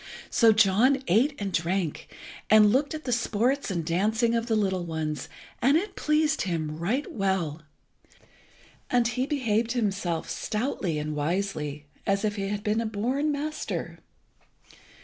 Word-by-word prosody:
So 230 Hz, -2 st, +6 dB
John 220 Hz, +6 st, +4 dB
ate 250 Hz, -, +3 dB
and 200 Hz, -2 st, -3 dB
drank, 170 Hz, -1 st, -1 dB, 0.4 s
and 215 Hz, -1 st, +7 dB
looked 285 Hz, +4 st, +1 dB
at 310 Hz, -, -7 dB
the 250 Hz, -, -3 dB
sports 240 Hz, +3 st, 0 dB
and 170 Hz, -4 st, -2 dB
dancing 215 Hz, +7 st, +1 dB
of 230 Hz, 0 st, 0 dB
the 225 Hz, -, +1 dB
little 190 Hz, -4 st, 0 dB
ones, 155 Hz, -4 st, -4 dB, 0.3 s
and 275 Hz, +5 st, +5 dB
it 400 Hz, +6 st, -3 dB
pleased 305 Hz, 0 st, +1 dB
him 160 Hz, -4 st, -2 dB
right 235 Hz, -, -1 dB
well, 190 Hz, -7 st, -1 dB, 1.3 s
and 245 Hz, -2 st, +3 dB
he 250 Hz, +2 st, -1 dB
behaved 230 Hz, -6 st, 0 dB
himself 195 Hz, -8 st, -1 dB
stoutly 210 Hz, -, -2 dB
and 150 Hz, 0 st, -3 dB
wisely, 150 Hz, -2 st, -2 dB, 0.2 s
as 200 Hz, +2 st, +1 dB
if 210 Hz, -1 st, -1 dB
he 195 Hz, -2 st, -2 dB
had 205 Hz, 0 st, -3 dB
been 215 Hz, +1 st, +1 dB
a 230 Hz, -, -2 dB
born 255 Hz, +8 st, 0 dB
master. 300 Hz, +2 st, -4 dB
210 Hz, 150 wpm, -27 LUFS, 180-250 Hz, 1.3 s, and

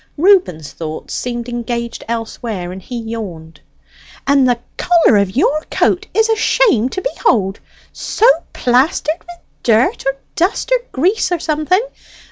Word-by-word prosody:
Reuben's 305 Hz, -, +3 dB
thoughts 155 Hz, +2 st, -7 dB
seemed 240 Hz, -1 st, -3 dB
engaged 235 Hz, -1 st, -4 dB
elsewhere, 225 Hz, -5 st, -4 dB
and 190 Hz, +1 st, -8 dB
he 245 Hz, +6 st, -7 dB
yawned. 195 Hz, -9 st, -7 dB, 0.6 s
"And 275 Hz, -2 st, +4 dB
the 245 Hz, -, +2 dB, 0.2 s
collar 335 Hz, -11 st, +4 dB
of 200 Hz, -1 st, 0 dB
your 295 Hz, +3 st, +2 dB
coat -, -, +1 dB
is 445 Hz, 0 st, +2 dB
a 445 Hz, -, +2 dB
shame 430 Hz, -, +2 dB
to 375 Hz, -, -5 dB
behold 210 Hz, -, 0 dB, 0.3 s
so 445 Hz, -, -1 dB, 0.3 s
plastered 280 Hz, +6 st, +1 dB
with 350 Hz, 0 st, -13 dB, 0.2 s
dirt, 230 Hz, +1 st, +2 dB
or 270 Hz, -, +1 dB, 0.2 s
dust, 370 Hz, +8 st, 0 dB
or -, -, +4 dB
grease, 365 Hz, +10 st, +1 dB
or 355 Hz, -, +2 dB
something. 325 Hz, +7 st, 0 dB
245 Hz, 140 wpm, -17 LUFS, 220-345 Hz, 0.6 s, And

